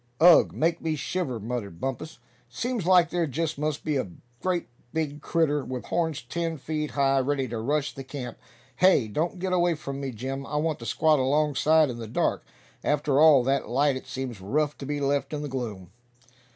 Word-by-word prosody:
"Ugh! 175 0 +7
make 165 +2 0
me 160 -1 -1
shiver," 140 -3 -3
muttered 105 -6 -5
Bumpus. 135 - -4 0.3
"Seems 225 - -3
like 180 -2 +5
there 175 -2 0
just 150 +2 -2
must 150 0 -2
be 150 -2 0
a 120 -8 -2 0.3
great 180 -2 -1 0.2
big 150 -2 -3
critter, 150 -4 +1
with 130 -1 -5
horns 160 -6 -1
ten 165 +5 -3
feet 150 +1 -3
high, 135 -1 +2
ready 135 0 0
to 115 -1 -3
rush 145 +5 -1
the 135 - -7
camp. 130 -3 -7 0.4
Hey! 185 -11 +5
don't 160 - -2
get 185 +1 -2
away 175 -1 +3
from 140 -2 -6
me, 135 - -3
Jim; 130 +3 -5
I - - -5
want 155 0 0
to 115 - -7
squat 155 -2 +3
alongside 150 +2 +3
in 120 - -7
the 115 - -6
dark. 110 - 0 0.4
After 145 -1 +1
all 150 -5 +7
that 135 -2 0
light 140 +3 +2
it 130 - -7
seems 125 -6 -5
rough 150 +9 0
to 135 - -6
be 145 0 -2
left 140 +1 0
in 150 0 -3
the - - -3
gloom." 110 -9 -5
145 Hz, 195 wpm, -26 LUFS, 130-160 Hz, 0.4 s, Ugh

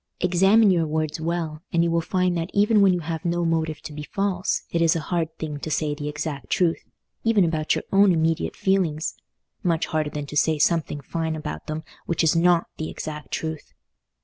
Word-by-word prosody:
Examine 195 +4 +5
your 170 -3 +2
words 155 0 -2
well, 160 -2 -2
and 170 -1 +3
you 170 - +1
will 170 0 +2
find 180 +1 0
that 165 +1 -2
even 210 +1 +4
when 195 -1 +6
you 180 -1 0
have 160 0 -4
no 175 0 0
motive 160 -2 -1
to 150 - -7
be 150 - -6
false, 190 +3 -1
it 170 - 0
is 165 +1 +4
a - - +1
very 155 - -5
hard 165 -2 -1
thing 150 -2 -5
to 155 - -5
say 155 -1 0
the 145 0 -4
exact 150 -1 -5
truth, 170 -3 +1 0.4
even 220 -5 +4
about 160 -2 0
your - - -3
own 195 0 +6
immediate 165 -1 0
feelings—much 170 -1 -2
harder 155 -1 -1
than 150 -1 -5
to 145 - -8
say 155 +1 +3
something 150 -1 +1
fine 160 +3 -3
about 75 - -6
them 155 +1 -4 0.2
which 170 - +1
is 160 +1 +3
not 170 0 +4
the 155 - -4
exact 150 -1 -6
truth. 160 -1 -5
165 Hz, 205 wpm, -24 LUFS, 155-175 Hz, 0.4 s, when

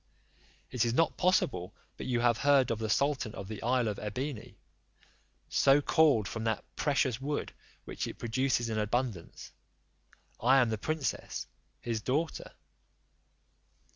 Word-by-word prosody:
It 125 -3 +1
is 120 0 0
not 165 - +2
possible 120 - +1 0.2
but - - -7
you 120 -2 +1
have 120 -1 +3
heard 140 -4 +4
of 115 - -2
the 110 -1 -3
sultan 130 -2 0
of 95 - -7
the 110 0 -7
isle 125 0 +1
of 105 - -3
Ebene, 120 +3 -5 0.9
so 135 +1 +4
called 145 - +3
from 115 0 -5
that 110 -1 -1
precious 135 -4 0
wood 145 +2 -3 0.3
which - - -4
it - - -7
produces 120 0 0
in 110 -1 -1
abundance; 110 -4 -3 0.9
I 130 +4 +5
am 125 -3 +3
the 110 - -2
princess 155 +3 -3 0.4
his 115 -2 -2
daughter. 150 +8 -2
120 Hz, 140 wpm, -31 LUFS, 110-140 Hz, 0.9 s, I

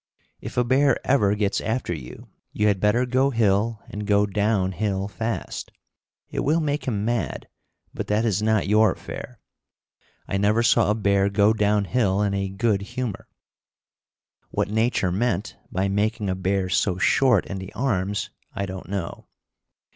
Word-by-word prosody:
If - - -8
a 125 - +4
bear 130 +2 +3
ever 105 -7 +3
gets 105 -1 0
after 110 -4 -2
you, 65 -6 -9 0.2
you 105 - 0
had 100 -2 +2
better 105 +5 +2
go 130 +2 +2
hill 110 -2 +1
and 105 0 -6
go 105 -1 +4
down 100 -1 0
hill 95 0 -2
fast. 110 +2 -4 0.6
It - - -3
will 155 +4 +2
make 150 -2 -1
him 105 -4 -1
mad, 120 0 -2 0.5
but - - -5
that 105 +2 +1
is 105 -3 +1
not 110 -1 +2
your 110 +2 +4
affair. 125 -4 -9 0.9
I 95 - -1
never 105 +4 +2
saw 115 -2 +4
a 105 - +2
bear 100 -2 +2
go 100 +2 +3
down 105 -1 +2
hill 105 -3 +1
in 100 -1 0
a 100 -1 -1
good 100 +1 0
humor. 110 +1 -5 1.2
What - - -2
nature 110 -4 +1
meant 105 0 -1 0.2
by 95 +2 0
making 105 +1 0
a - - -1
bear 95 0 0
so 95 0 +1
short 120 +2 +3
in 100 - -5
the 95 0 -8
arms 105 -6 -1 0.2
I 100 - -2
don't 95 -1 -8
know. 95 -4 -5
105 Hz, 165 wpm, -24 LUFS, 100-115 Hz, 1.2 s, a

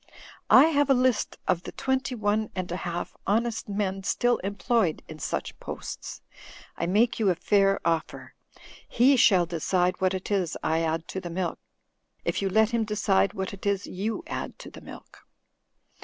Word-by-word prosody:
I 260 - +9
have 290 -2 +2
a 270 - +6
list 250 -2 +1
of 180 -2 +2
the - - -8
twenty 265 -1 -1
one 215 0 0
and 185 -2 -4
a - - -1
half 175 -1 -4
honest 225 +1 0
men 195 -1 -2
still 245 +5 +1
employed 200 -2 0
in 155 -1 -10
such - - -4
posts. - - -7 0.5
I - - -2
make 215 +7 +2
you 210 -3 +3
a 180 - +2
fair 195 +2 +2
offer. 165 -1 -2 0.6
He 260 +4 +5
shall 190 -8 +5
decide 180 +2 0
what 190 0 +2
it 190 +2 -6
is 185 -5 0
I 160 +1 +1
add 165 0 -1
to 190 - -4
the 175 - -6
milk, 175 0 -3 0.7
if - - -1
you 195 - 0
let 220 +3 +3
him 235 -1 +1
decide 205 -2 +1
what 190 +1 -3
it 200 +1 -6
is 200 -1 0
you 215 - -3
add - - -5
to - - -11
the - - -12
milk. - - -12
195 Hz, 180 wpm, -26 LUFS, 180-225 Hz, 0.7 s, I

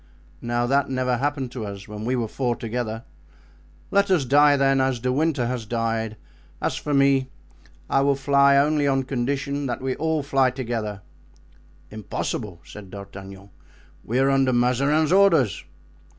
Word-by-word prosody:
Now 120 0 -1
that 140 +2 +1
never 130 -1 0
happened 135 -1 -2
to 125 -3 -6
us 100 -1 -7
when 105 +1 -7
we 125 +2 0
were 120 -3 -1
four 120 +1 -2
together. 115 -1 -4 0.9
Let 200 0 +3
us 175 -8 +2
die, 145 +2 +5
then, 135 -1 +3
as 130 -2 0
De 125 +2 -1
Winter 145 -3 +1
has 120 -2 -4
died; 115 -1 -2 0.4
as - - -1
for 150 - -5
me, 140 -2 +3 0.6
I 135 - +2
will 140 0 +2
fly 140 0 +4
only 145 +1 +2
on 135 -1 +1
condition 140 +2 -2
that 120 - -3
we 130 0 -2
all 160 -1 -1
fly 135 -2 +2
together." 115 -6 -4 0.9
"Impossible," 105 -3 -5
said 100 +3 -11
D'Artagnan; 100 0 -10 0.5
"we 120 - -2
are 135 +1 +3
under 135 -1 +2
Mazarin's 140 +6 +2
orders." 185 - +3
130 Hz, 155 wpm, -23 LUFS, 115-140 Hz, 0.9 s, die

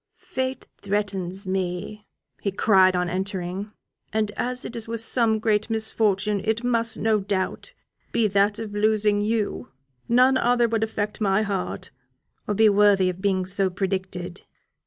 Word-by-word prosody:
"Fate 260 0 -4
threatens 195 -2 -3
me," 190 +3 -3 0.3
he 200 - -1
cried, 190 -2 +4
on 180 0 0
entering; 190 +2 -4 0.4
"and 215 -1 0
as 250 +3 -3
it 240 - -6
is 230 -1 -5
with 230 0 -3
some 225 -1 +3
great 215 0 0
misfortune, 210 -2 0
it 220 +2 -1
must, 230 -2 +1
no 220 -1 +2
doubt, 195 - -3 0.4
be 225 -2 +2
that 200 +1 +2
of 220 -2 -6
losing 210 0 +2
you; 215 0 -1 0.4
none 255 +2 +5
other 240 0 +3
would 225 -1 0
affect 215 0 -3
my 200 +1 +2
heart, 200 -3 -4 0.6
or 210 - -1
be 220 +2 +5
worthy 200 -2 +4
of 180 +1 -12
being 190 -2 +1
so 190 +1 +1
predicted. 185 -1 -4
205 Hz, 150 wpm, -24 LUFS, 190-220 Hz, 0.6 s, none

